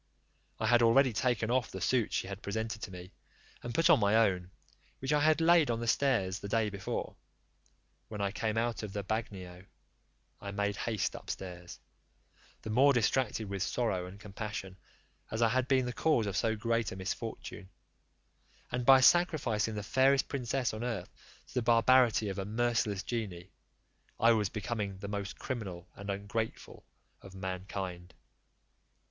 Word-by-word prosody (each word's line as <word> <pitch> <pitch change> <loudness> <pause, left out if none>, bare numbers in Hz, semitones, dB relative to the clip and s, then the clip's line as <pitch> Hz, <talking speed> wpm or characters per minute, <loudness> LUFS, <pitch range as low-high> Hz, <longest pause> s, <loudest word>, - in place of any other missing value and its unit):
I - - -1
had 120 0 +5
already 120 +2 +5
taken 120 0 0
off 125 -2 +1
the 95 - -7
suit 115 +5 +1
she - - -1
had 100 +1 -7
presented 110 +1 -3
to - - -5
me, 90 0 -10 0.5
and 120 - -5
put 165 - +4
on 165 -6 +6
my 100 0 +3
own, 95 -5 +2 0.5
which 135 +2 -1
I 150 - +4
had 155 +1 +4
laid 165 -3 +5
on 115 -1 0
the 120 - -3
stairs 115 -7 +1
the 100 - -6
day 110 0 +1
before, 100 -1 -4 0.9
when 105 - -7
I 100 -1 0
came 110 +1 -2
out 115 0 0
of 105 -3 -6
the 100 - -3
bagnio: 95 -4 -5 0.8
I 100 - -7
made 100 0 -1
haste 110 -4 -1
upstairs, 90 -2 -7 0.8
the 110 - -4
more 135 +5 +5
distracted 120 -2 +1
with 100 -1 -4
sorrow 95 -3 -1
and 95 +3 -11
compassion, 105 -2 -6 0.5
as 110 +2 0
I 115 - +4
had 130 +2 +1
been 130 -1 +3
the 125 - -3
cause 120 -3 +2
of 100 -1 -3
so 110 +1 +1
great 115 0 0
a - - -6
misfortune; 95 0 -6 1.0
and 125 0 -1
by 135 -1 +8
sacrificing 130 - +3
the 105 - -4
fairest 135 +4 +3
princess 130 -2 -1
on 110 +2 -5
earth 115 -7 -4 0.4
to - - -14
the 125 - +1
barbarity 115 -1 +4
of 95 - -4
a 95 - -3
merciless 110 -2 0
genie, 100 -6 -5 0.7
I 115 - +6
was 105 -4 +2
becoming 105 -2 -3
the 100 - -7
most 100 -1 -4
criminal 95 -9 -5
and 100 0 -8
ungrateful 100 +3 -4 0.3
of 95 -1 -12
mankind. 95 -1 -5
110 Hz, 165 wpm, -31 LUFS, 100-120 Hz, 1.0 s, by